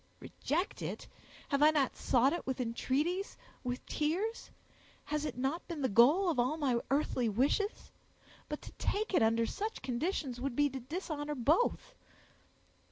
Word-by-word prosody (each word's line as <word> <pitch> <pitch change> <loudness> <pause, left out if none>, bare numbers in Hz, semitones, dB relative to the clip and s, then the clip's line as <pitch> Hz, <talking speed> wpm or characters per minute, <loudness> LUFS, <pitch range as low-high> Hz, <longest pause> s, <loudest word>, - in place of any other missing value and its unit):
"Reject 345 +8 -2
it! - - -5 0.4
Have 280 -1 +1
I 300 - +8
not 290 -4 +1
sought 260 +3 +3
it 345 - -4
with 265 -1 -2
entreaties—with 260 - -2
tears? 370 +10 -1 0.5
Has 300 0 -2
it 265 -5 -4
not 270 +7 -2
been 325 -5 -4
the 260 - +2
goal 275 - +5
of 320 -7 +1
all 255 +6 +1
my 260 -6 +1
earthly 265 -4 +1
wishes? 280 - 0 0.6
But 300 - -5
to - - -9
take 425 +1 -1
it - - +4
under 225 +1 +3
such 425 - -4
conditions 260 -1 -2
would 270 -2 -2
be 290 0 +3
to 265 - -5
dishonor 300 +1 -4
both. 310 - +1
290 Hz, 155 wpm, -33 LUFS, 250-335 Hz, 0.6 s, I